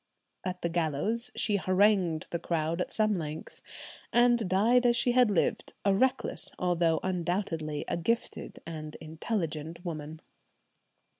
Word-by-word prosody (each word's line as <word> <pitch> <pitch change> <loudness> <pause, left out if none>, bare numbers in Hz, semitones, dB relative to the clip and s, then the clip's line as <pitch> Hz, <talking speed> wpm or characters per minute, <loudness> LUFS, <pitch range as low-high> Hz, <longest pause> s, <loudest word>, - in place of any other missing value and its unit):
At 180 -1 -4
the 170 - +1
gallows 175 - 0
she 210 -3 +1
harangued 185 -4 +2
the 170 - -1
crowd 165 0 -1
at - - -3
some 215 -3 +1
length, 155 0 -7 0.5
and 240 -4 +4
died 225 +7 +4
as 240 - +4
she 245 - +3
had 250 -2 +5
lived, 200 - 0
a 200 - +4
reckless 260 +6 0
although 170 -2 +2
undoubtedly 175 -4 -2
a - - -1
gifted 230 +8 -2
and 155 -2 -7
intelligent 160 0 -4
woman. 155 -2 -5
180 Hz, 135 wpm, -29 LUFS, 160-215 Hz, 0.5 s, had